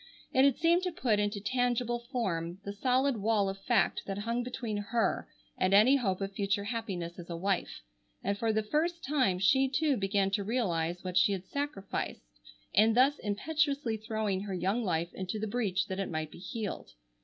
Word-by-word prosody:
It 260 - +5
had 280 -3 +3
seemed 335 +2 +3
to 365 -1 -2
put 235 -10 +1
into 205 0 0
tangible 240 +2 0
form 175 - -2
the 200 - -4
solid 255 +4 +2
wall 210 -1 +2
of 195 0 -5
fact 225 -7 +2
that 195 -1 -3
hung 230 +4 -1
between 240 -3 -4
her 205 +3 0 0.3
and 185 +1 +3
any 245 +7 +7
hope 195 -7 -1
of 195 0 -3
future 200 0 0
happiness 195 -6 -4
as 175 - -9
a 170 - -4
wife, 185 - -2 0.4
and 200 +1 0
for 225 +2 0
the 220 0 +1
first 330 +9 -1
time 260 -10 +2
she 265 +8 +4
too 290 +1 +2
began 195 0 +1
to 200 0 0
realize 180 -7 -1
what 185 -1 -2
she 200 +2 +5
had 190 -1 -4
sacrificed 280 - -4 0.5
in 220 +2 +5
thus 270 +4 +4
impetuously 280 +3 0
throwing 215 -3 -2
her 200 -2 -4
young 195 +7 0
life 170 -3 -1
into 190 +2 -4
the 215 - -2
breach 210 -4 0
that 190 0 -4
it 195 - -2
might 155 -1 -3
be - - -12
healed. 205 +2 -5
210 Hz, 190 wpm, -31 LUFS, 195-245 Hz, 0.5 s, any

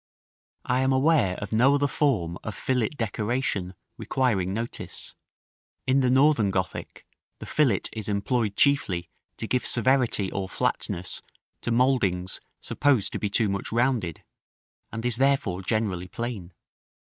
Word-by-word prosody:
§ - - - 0.6
XVI. - - +1
I - - +2
am 130 0 +2
aware 130 - +3
of 100 - -6
no 130 +6 +5
other 145 0 +2
form 115 - 0
of 110 - -5
fillet 125 -4 0
decoration 110 -5 -2 0.2
requiring 110 -9 0
notice: 115 +4 -6 0.7
in 130 +1 +3
the 130 -2 +2
Northern 130 -5 +4
Gothic, 95 -1 -4 0.3
the - - -9
fillet 130 -11 +2
is 110 -2 -5
employed 105 +1 0
chiefly 95 -12 +2 0.3
to - - -4
give 125 +2 0
severity 120 -5 +2
or 95 -1 -3
flatness 90 0 -2 0.4
to - - -3
mouldings 115 -8 +1 0.2
supposed 135 -8 +1
to - - -3
be 105 - -1
too 110 +2 +2
much 100 0 -3
rounded, 115 - 0 0.7
and 115 +2 -5
is 120 -2 +2
therefore 130 -9 +1
generally 95 -3 -1
plain. 110 -4 -5
115 Hz, 145 wpm, -26 LUFS, 95-130 Hz, 0.7 s, no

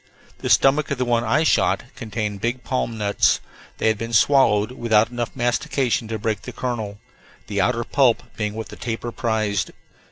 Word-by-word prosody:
The - - -3
stomach 140 +2 +4
of 140 - -1
the 125 - 0
one 120 -1 +1
I 120 +8 +2
shot - - +2
contained 105 -3 -4
big 125 +2 -2
palm 120 -3 -2
nuts; 105 -1 +2 0.4
they - - 0
had 110 -1 +2
been 115 +1 -5
swallowed 110 -3 +4
without 115 -2 +2
enough 120 -1 -4
mastication 125 0 0
to 110 0 -3
break 110 0 -2
the - - -7
kernel, 110 -5 -4 0.5
the 100 -2 -1
outer 120 +3 +1
pulp 125 -2 +2
being 105 -1 -3
what 110 0 -6
the - - -9
tapir 120 0 -4
prized. 110 -6 -1
115 Hz, 180 wpm, -22 LUFS, 110-125 Hz, 0.5 s, stomach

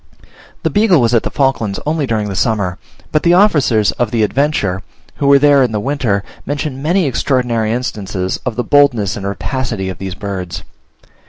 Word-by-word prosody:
The - - 0
Beagle 205 -5 +4
was 120 -1 +2
at 115 - +4
the - - -3
Falklands 135 -8 0
only 150 -2 0
during 110 -3 -1
the 100 - -4
summer, 100 -3 0 0.3
but 155 - +2
the 170 0 +4
officers 145 - +3
of 120 - +1
the 115 -1 +1
Adventure, 105 -6 0 0.4
who 140 - 0
were 140 0 +7
there 145 0 +5
in 125 -4 +1
the 105 - 0
winter, 115 -5 -1 0.2
mention 145 -1 -4
many 175 +4 +1
extraordinary 120 -4 0
instances 100 -6 -3
of 125 -3 -3
the 125 - -1
boldness 125 -9 +3
and 100 -1 -5
rapacity 100 0 -3
of 95 - -7
these 95 -1 -5
birds. 95 -3 -5
120 Hz, 180 wpm, -16 LUFS, 100-140 Hz, 0.4 s, were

